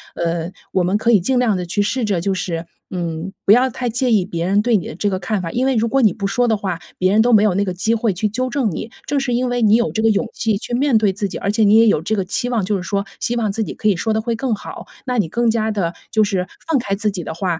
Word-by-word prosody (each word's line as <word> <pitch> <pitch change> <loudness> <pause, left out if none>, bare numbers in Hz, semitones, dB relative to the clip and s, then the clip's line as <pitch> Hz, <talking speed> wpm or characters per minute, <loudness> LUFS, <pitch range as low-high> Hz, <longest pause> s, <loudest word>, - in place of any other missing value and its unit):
呃， 170 0 -2 0.2
我 185 - +2
们 180 +3 +1
可 230 +2 +2
以 215 - +6
尽 250 +9 0
量 240 -4 +2
地 180 -1 -3
去 205 +4 0
试 250 +5 -1
着， 200 -4 0
就 195 +2 0
是， 170 -3 -3 0.3
嗯， 170 0 -4
不 - - +5
要 250 +4 +5
太 250 0 -3
介 240 +2 0
意 210 -4 +4
别 170 -3 -3
人 200 +2 +3
对 240 0 +2
你 180 - -5
的 - - -7
这 205 +4 0
个 190 - -1
看 215 +1 -2
法。 170 - -4
因 250 +7 0
为 265 - +1
如 230 0 +2
果 270 +4 +2
你 210 -5 +4
不 200 0 -5
说 245 +5 +1
的 225 - +3
话， 185 -4 -3 0.2
别 185 +1 +2
人 215 +2 +4
都 245 - +2
没 210 -1 +6
有 210 -3 +3
那 200 - +2
个 185 - -2
机 220 +6 0
会 225 -2 0
去 200 +4 -1
纠 255 +5 -2
正 255 -3 0
你， 220 +7 -6 0.2
正 285 0 +1
是 265 -3 -1
因 250 +1 0
为 245 0 -1
你 215 0 +5
有 235 0 +1
这 220 - -1
个 225 - +4
勇 220 +3 +1
气 220 -2 0
去 235 - -7
面 265 -2 +3
对 215 -2 +2
自 205 +1 -2
己， - - -6
而 200 - -1
且 220 +1 +2
你 205 +1 +5
也 225 0 +6
有 205 - +3
这 220 +5 0
个 195 - 0
期 215 +6 -2
望， 235 -5 0
就 200 +2 0
是 180 - -5
说 200 +2 -2
希 240 - -1
望 220 -4 0
自 220 +3 -1
己 - - -5
可 215 - -2
以 205 - +4
说 220 +6 -1
得 220 - 0
会 230 +1 -2
更 245 +1 -1
好， 205 - -7 0.2
那 250 -1 -1
你 205 -7 +1
更 235 +7 +1
加 220 -1 0
地 180 -5 -1 0.2
就 220 - +3
是 190 -3 -1 0.2
放 320 -4 +2
开 205 -5 -3
自 210 +1 0
己 190 -4 -4
的 160 - -5
话， 170 -1 -2
210 Hz, 345 characters per minute, -19 LUFS, 190-235 Hz, 0.3 s, 以